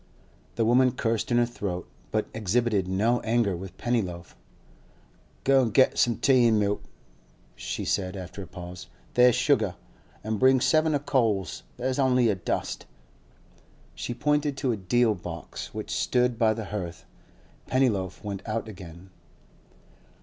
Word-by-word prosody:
The 115 Hz, -, +1 dB
woman 125 Hz, +2 st, +4 dB
cursed 115 Hz, -1 st, -1 dB
in 120 Hz, -, +2 dB
her 120 Hz, -, +4 dB
throat, 100 Hz, -7 st, -5 dB, 0.2 s
but 110 Hz, -1 st, 0 dB
exhibited 110 Hz, -2 st, 0 dB
no 110 Hz, +6 st, +1 dB
anger 110 Hz, -4 st, +1 dB
with 95 Hz, +1 st, -9 dB
Pennyloaf. 95 Hz, -8 st, -2 dB, 1.1 s
'Go 135 Hz, 0 st, +5 dB
an' 120 Hz, -, +1 dB
get 130 Hz, +4 st, +3 dB
some 120 Hz, -2 st, +3 dB
tea 130 Hz, -3 st, +4 dB
an' 110 Hz, -2 st, +3 dB
milk,' 105 Hz, 0 st, 0 dB, 0.7 s
she -, -, -4 dB
said, 95 Hz, 0 st, -1 dB
after 95 Hz, +2 st, -7 dB
a 95 Hz, -, -8 dB
pause. 90 Hz, 0 st, -9 dB, 0.3 s
'There 125 Hz, 0 st, +6 dB
is 120 Hz, -, +1 dB
sugar. 125 Hz, -7 st, +2 dB, 0.5 s
An' 110 Hz, 0 st, -2 dB
bring 130 Hz, 0 st, +5 dB
seven 155 Hz, +3 st, +3 dB
o' -, -, +1 dB
coals; 115 Hz, -, 0 dB, 0.2 s
there's 130 Hz, +2 st, -2 dB
only 125 Hz, -3 st, +3 dB
a 105 Hz, -, +2 dB
dust.' 90 Hz, -, -3 dB, 1.1 s
She 120 Hz, -, -5 dB
pointed 150 Hz, +1 st, 0 dB
to 135 Hz, -2 st, 0 dB
a -, -, 0 dB
deal 110 Hz, +4 st, +2 dB
box 85 Hz, -3 st, -7 dB
which -, -, -6 dB
stood 125 Hz, -2 st, +1 dB
by 110 Hz, -2 st, +3 dB
the 110 Hz, -, -5 dB
hearth. 90 Hz, -5 st, -6 dB, 0.6 s
Pennyloaf 110 Hz, -9 st, 0 dB
went 100 Hz, -2 st, -4 dB
out 110 Hz, +1 st, -2 dB
again. 95 Hz, -2 st, -11 dB
115 Hz, 150 wpm, -27 LUFS, 95-125 Hz, 1.1 s, There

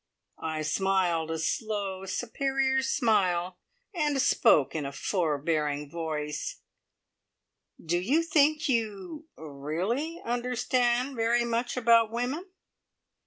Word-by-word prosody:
I 155 Hz, -1 st, -2 dB
smiled, 175 Hz, -1 st, +1 dB
a 160 Hz, -, -2 dB
slow, 195 Hz, +3 st, -2 dB
superior 265 Hz, +4 st, 0 dB
smile, 185 Hz, -9 st, +1 dB, 0.3 s
and 300 Hz, -5 st, 0 dB
spoke 150 Hz, -, +4 dB
in 155 Hz, -, -2 dB
a 140 Hz, -, -4 dB
forbearing 150 Hz, -3 st, -1 dB
voice: 150 Hz, -3 st, -4 dB, 1.2 s
"Do 170 Hz, +2 st, -1 dB
you 275 Hz, -, +2 dB
think 310 Hz, -1 st, +3 dB
you 230 Hz, -, -2 dB
er 155 Hz, -2 st, -9 dB
really 195 Hz, -, -2 dB
understand 245 Hz, +1 st, 0 dB
very 235 Hz, +1 st, +2 dB
much 235 Hz, +2 st, -1 dB
about 230 Hz, -2 st, +5 dB
women?" 255 Hz, -, -3 dB
220 Hz, 105 wpm, -28 LUFS, 165-255 Hz, 1.2 s, about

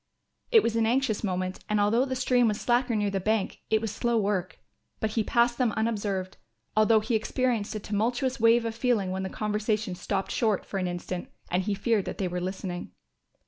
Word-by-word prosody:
It 450 Hz, -3 st, +7 dB
was 230 Hz, -, 0 dB
an 225 Hz, -1 st, +2 dB
anxious 240 Hz, -3 st, +1 dB
moment 185 Hz, -1 st, -2 dB
and 210 Hz, 0 st, +2 dB
although 220 Hz, +5 st, +3 dB
the 260 Hz, -1 st, -3 dB
stream 250 Hz, -1 st, +3 dB
was 210 Hz, -1 st, 0 dB
slacker 245 Hz, -1 st, +1 dB
near 205 Hz, -1 st, +1 dB
the 195 Hz, -, 0 dB
bank 215 Hz, +1 st, 0 dB
it 220 Hz, 0 st, +3 dB
was 225 Hz, -3 st, -2 dB
slow 235 Hz, +2 st, 0 dB
work. 195 Hz, -5 st, -1 dB, 0.4 s
But 220 Hz, -, -1 dB
he 220 Hz, 0 st, +1 dB
passed 240 Hz, +2 st, +2 dB
them 240 Hz, -4 st, +2 dB
unobserved, 205 Hz, -4 st, -2 dB, 0.4 s
although 215 Hz, 0 st, +5 dB
he 235 Hz, -, -2 dB
experienced 225 Hz, -1 st, 0 dB
a -, -, -2 dB
tumultuous 240 Hz, +6 st, -1 dB
wave 230 Hz, +1 st, +5 dB
of 225 Hz, -, -2 dB
feeling 230 Hz, -5 st, +1 dB
when 190 Hz, 0 st, -2 dB
the 190 Hz, -, -3 dB
conversation 210 Hz, -1 st, -1 dB
stopped 190 Hz, +2 st, -3 dB
short 215 Hz, -4 st, +1 dB
for 195 Hz, -, -3 dB
an 185 Hz, -, -1 dB
instant 175 Hz, 0 st, -5 dB, 0.2 s
and 180 Hz, +1 st, +2 dB
he 200 Hz, +2 st, -1 dB
feared 220 Hz, -1 st, +1 dB
that -, -, -5 dB
they 190 Hz, -, -1 dB
were 180 Hz, 0 st, -3 dB
listening. 185 Hz, -1 st, -5 dB
215 Hz, 205 wpm, -27 LUFS, 195-235 Hz, 0.4 s, It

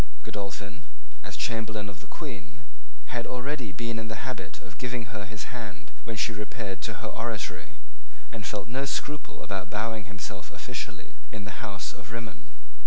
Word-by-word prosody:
Godolphin, 100 Hz, +3 st, -1 dB, 0.4 s
as -, -, -2 dB
Chamberlain 110 Hz, -2 st, +3 dB
of 100 Hz, -3 st, -4 dB
the -, -, -9 dB
Queen, 110 Hz, -, -3 dB, 0.5 s
had 120 Hz, -1 st, +3 dB
already 125 Hz, -1 st, +2 dB
been 115 Hz, +5 st, +2 dB
in 110 Hz, -, -1 dB
the 110 Hz, +4 st, 0 dB
habit 130 Hz, -2 st, 0 dB
of 105 Hz, -2 st, -9 dB
giving 120 Hz, -3 st, +1 dB
her 100 Hz, -1 st, 0 dB
his 110 Hz, +3 st, -2 dB
hand 95 Hz, -, -3 dB, 0.2 s
when 115 Hz, -, +3 dB
she 110 Hz, +4 st, +6 dB
repaired 105 Hz, -2 st, 0 dB
to -, -, -1 dB
her -, -, +3 dB
oratory, -, -, +1 dB, 0.6 s
and 115 Hz, -, -1 dB
felt 100 Hz, +1 st, +2 dB
no 135 Hz, +4 st, +3 dB
scruple 150 Hz, +2 st, +1 dB
about 95 Hz, -2 st, +1 dB
bowing 110 Hz, 0 st, +3 dB
himself 95 Hz, -2 st, -2 dB
officially -, -, -2 dB, 0.2 s
in 110 Hz, -2 st, -2 dB
the 105 Hz, +4 st, -3 dB
house 100 Hz, -4 st, +1 dB
of 100 Hz, -, -7 dB
Rimmon. 115 Hz, -, -3 dB
110 Hz, 170 wpm, -33 LUFS, 100-120 Hz, 0.6 s, she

